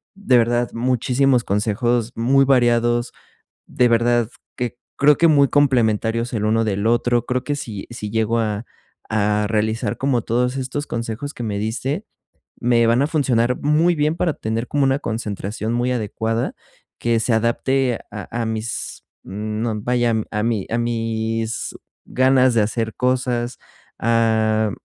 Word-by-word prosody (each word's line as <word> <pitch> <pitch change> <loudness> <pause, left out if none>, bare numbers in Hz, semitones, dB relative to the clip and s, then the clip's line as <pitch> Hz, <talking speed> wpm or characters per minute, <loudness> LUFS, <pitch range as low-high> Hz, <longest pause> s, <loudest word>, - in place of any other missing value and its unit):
de 195 -11 +3
verdad 120 +1 +1
muchísimos 125 +1 +1
consejos 115 +3 0
muy 135 +4 +3
variados, 120 -2 +2 0.5
de 125 -1 +2
verdad 120 -1 +2 0.3
que 120 -1 -4 0.3
creo 145 0 +6
que 170 - +5
muy 145 -3 +5
complementarios 115 -4 +2
el 105 -2 -1
uno 110 +1 +2
del 100 -1 -1
otro. 120 +1 +2
Creo 125 0 -1
que 145 - -2
si 110 -8 -6
si 105 -3 -6
llego 110 +1 +1
a 105 0 -2 0.4
a 105 -1 +1
realizar 110 0 -1
como 135 -3 +1
todos 125 +4 0
estos 135 +3 -3
consejos 115 +5 -4
que - - -9
me 105 -3 -2
diste, 130 - -2 0.6
me 120 -1 +3
van 115 +3 +3
a - - +2
funcionar 125 -6 +1
muy 155 +4 +3
bien 155 +1 0
para 170 -1 +1
tener 110 +2 -3
como 145 -1 +1
una 135 +1 +2
concentración 110 -2 -4
muy 120 +1 0
adecuada 115 0 -2 0.4
que 115 -1 +1
se 115 - 0
adapte 120 +2 +1
a 105 -1 -7
a - - -2
mis, 110 +1 -4 0.2
no 110 +3 -3
vaya, 120 0 +1 0.2
a 105 -1 -1
mi 110 -4 -1
a 115 - 0
mis 115 -1 -2 0.3
ganas 130 -1 +3
de 115 - +4
hacer 110 +1 -2
cosas, 125 -1 -1 0.4
ah, 110 -1 +2
120 Hz, 150 wpm, -21 LUFS, 110-125 Hz, 0.6 s, creo